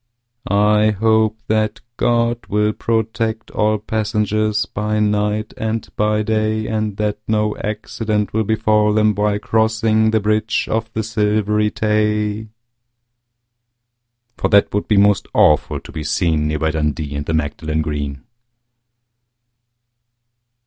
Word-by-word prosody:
I 105 0 +3
hope 110 0 +2
that 110 -1 0 0.2
God 120 0 0
will 105 +1 +1
protect 110 0 -2
all 110 0 +1
passengers 110 0 -1
By 105 +1 -2
night 105 0 0
and 110 0 -2
by 105 0 +1
day, 110 0 0
And 110 -2 -2
that 105 -1 -1
no 105 -1 0
accident 105 0 -3
will 110 +1 +1
befall 105 0 +2
them 110 0 +3
while 105 0 0
crossing 110 0 +1
The 110 0 +2
Bridge 110 +2 0
of 115 0 -2
the 110 - -2
Silvery 105 -1 +1
Tay, 105 0 0 1.9
For - - 0
that 100 -1 +4
would 105 - -1
be 105 - +2
most 100 0 +3
awful 75 -1 +3
to - - -13
be 80 -2 -5
seen 80 -1 0
Near 75 0 -1
by 80 0 0
Dundee 75 -1 -2
and 70 0 -4
the 80 - 0
Magdalen 80 +1 -2
Green. 75 -2 -4
105 Hz, 130 wpm, -19 LUFS, 105-110 Hz, 1.9 s, that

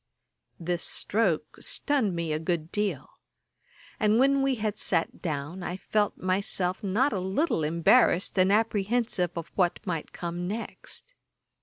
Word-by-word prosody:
This 175 0 -2
stroke 195 -7 0
stunned 255 - +1
me 165 -2 -2
a 155 - -1
good 165 0 -2
deal; 210 -1 -3 0.8
and 215 0 +3
when 275 +2 +4
we 270 -1 +2
had 215 -2 -3
sat 165 - 0
down, 155 +2 -4
I 175 +1 -4
felt 205 +1 0
myself 185 0 -1
not 220 +8 +1
a 195 - -1
little 190 - 0
embarrassed, 170 +5 +3
and 185 +1 +4
apprehensive 215 -2 +1
of 170 - -6
what 180 -3 +1
might 165 -5 -3
come 175 +1 -4
next. 230 - -6
190 Hz, 140 wpm, -27 LUFS, 170-220 Hz, 0.8 s, when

